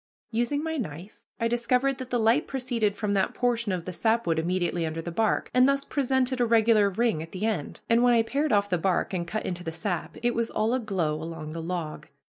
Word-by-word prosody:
Using 240 +6 0
my 320 0 -2
knife, 185 - -6 0.2
I 230 - +1
discovered 250 +3 +1
that 260 -1 -6
the 245 - +1
light 230 +6 +3
proceeded 240 -6 -1
from 210 -1 -1
that 195 -1 +1
portion 235 -3 0
of 180 -2 -3
the 185 - -5
sapwood 220 -5 +1
immediately 175 0 0
under 160 0 -3
the 170 +1 -5
bark, 215 +5 0
and 255 +2 +5
thus 275 0 +1
presented 260 -2 0
a - - +4
regular 220 -2 +4
ring 220 -4 0
at 165 - -9
the 195 +3 -2
end, 205 -10 -2
and 230 +1 +4
when 245 -1 +5
I 230 - +4
pared 285 +5 -1
off 205 0 +3
the 180 -3 0
bark 185 +2 0
and 170 -2 -2
cut 215 +5 -3
into 175 -1 -4
the 165 - -4
sap, 175 +1 -4
it 240 0 +2
was 230 -1 -1
all 215 +2 0
aglow 195 -11 0
along 155 0 -6
the 165 +1 -5
log. 165 -2 -4
220 Hz, 225 wpm, -27 LUFS, 175-240 Hz, 0.2 s, and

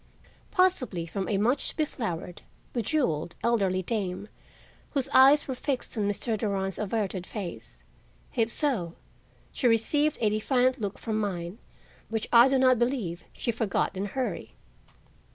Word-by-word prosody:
Possibly 265 - +1
from 190 +3 -4
a 205 - +1
much 235 +7 +1
beflowered, 220 - -3 0.3
bejeweled, 220 - 0
elderly 195 -6 +1
dame, 200 -1 -3 0.7
whose 275 -3 +1
eyes 275 +3 +6
were 265 - -2
fixed 255 0 -3
on 210 -3 0
Mr. 220 +3 -1
Durand's 195 -3 -2
averted 200 -3 -2
face. 115 - -7 0.5
If 230 0 +1
so, 225 - 0 0.6
she 255 - 0
received 290 +7 +2
a 215 -2 +2
defiant 250 +3 +1
look 200 -2 -3
from 220 -2 -2
mine, 185 -2 -3 0.5
which 225 -1 -2
I 235 +2 +9
do 270 0 +2
not 255 -2 +4
believe 225 -10 -1
she 235 - -2
forgot 220 -3 -1
in 190 +2 -2
a 200 - -8
hurry. 245 -8 -3
220 Hz, 140 wpm, -28 LUFS, 190-255 Hz, 0.7 s, I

